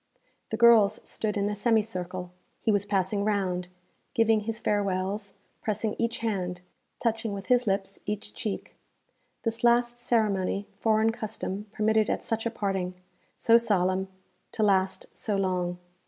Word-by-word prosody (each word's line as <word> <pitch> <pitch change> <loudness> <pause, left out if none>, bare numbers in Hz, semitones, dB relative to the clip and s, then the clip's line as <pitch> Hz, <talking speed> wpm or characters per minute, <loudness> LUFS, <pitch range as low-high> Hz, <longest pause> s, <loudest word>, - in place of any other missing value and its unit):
The 220 - -2
girls 225 -3 +6
stood 210 -1 0
in 200 0 +1
a 210 - -1
semicircle; 185 -5 -1 0.3
he 225 - +1
was 205 -1 +2
passing 200 0 +1
round, 190 -4 0 0.5
giving 225 -2 +4
his 220 +1 -4
farewells, 200 -1 -1 0.3
pressing 215 0 -1
each 235 +1 0
hand, 180 -5 -2 0.4
touching 225 -2 -1
with 195 -1 -7
his 250 -1 +4
lips 195 0 -1
each 210 0 -4
cheek. 210 -3 -4 0.7
This 230 0 -2
last 240 0 +3
ceremony 205 -5 +1
foreign 220 +1 +3
custom 215 -2 -4
permitted 220 0 +2
at - - -1
such 225 0 -1
a - - 0
parting 195 -5 -2 0.4
so 230 0 +6
solemn, 190 -4 +1 0.5
to 220 - 0
last 190 -2 +2
so 210 -3 -1
long. 180 -2 0
210 Hz, 140 wpm, -28 LUFS, 190-225 Hz, 0.7 s, girls